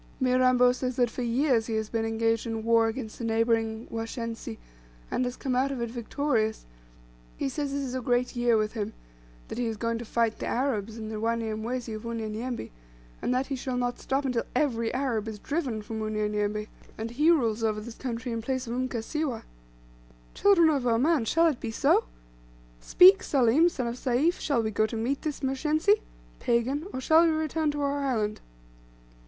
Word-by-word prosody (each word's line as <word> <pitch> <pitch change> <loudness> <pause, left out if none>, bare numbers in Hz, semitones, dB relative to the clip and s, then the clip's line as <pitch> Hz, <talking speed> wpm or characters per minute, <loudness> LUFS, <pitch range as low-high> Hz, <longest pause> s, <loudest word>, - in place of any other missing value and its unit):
"Mirambo 255 -1 +4
says 255 0 -3
that 245 -2 +2
for 250 - -5
years 240 -1 +2
he 225 - -2
has 220 -1 -1
been 225 0 -1
engaged 225 0 0
in 225 -1 -3
war 230 0 +4
against 225 -1 -5
the - - -5
neighbouring 225 0 +1
Washensi 225 - -5 0.5
and - - +1
has 245 0 -4
come 260 -2 -2
out 265 +2 +2
of 265 - -4
it 235 -1 -3
victorious; 235 -2 -1 0.7
he - - -1
says 280 - -3
this 280 0 -2
is 255 -2 -4
a 260 - -2
great 245 +1 0
year 240 -1 +3
with 215 0 -1
him; 220 -1 -3 0.5
that - - -6
he 245 - 0
is 220 -1 -3
going 230 +1 -1
to - - -5
fight 230 -1 0
the - - -3
Arabs, 230 -4 -1
and 220 -1 -6
the 215 - -4
Wanyamwezi 230 +1 -2
of 215 +2 -6
Unyanyembe, 230 +1 -4 0.5
and - - -1
that 255 +2 +1
he 275 - -3
shall 255 0 -3
not 245 0 -1
stop 275 +1 -1
until 250 -3 +1
every 235 -5 +1
Arab 250 -5 -1
is 220 -1 -5
driven 255 -3 -3
from 220 +1 -5
Unyanyembe, 210 -1 -1 0.3
and 225 +1 -4
he 300 +7 +3
rules 230 -9 +2
over 215 -1 +1
this 225 +2 -8
country 245 0 -4
in 230 0 -2
place 260 +2 -2
of 230 - -4
Mkasiwa. 255 +2 -2 0.9
Children 340 -6 +5
of 270 -4 0
Oman, 250 +3 +3
shall 330 +9 +3
it 310 -7 +2
be 230 - -4
so? 225 - +3 0.7
Speak, 370 - +7
Salim, 275 +5 +4
son 255 -7 -3
of 235 +1 -3
Sayf, 275 +8 +1
shall 245 -7 +1
we 220 - -1
go 215 +1 +2
to 225 - -6
meet 245 +5 -1
this 305 -2 -4
Mshensi 310 +10 +2 0.4
(pagan) 255 +7 0
or - - -4
shall 320 +4 +5
we 335 - +4
return 315 0 0
to 290 0 -2
our 285 0 0
island?" 220 -6 -1
240 Hz, 195 wpm, -27 LUFS, 225-270 Hz, 0.9 s, Speak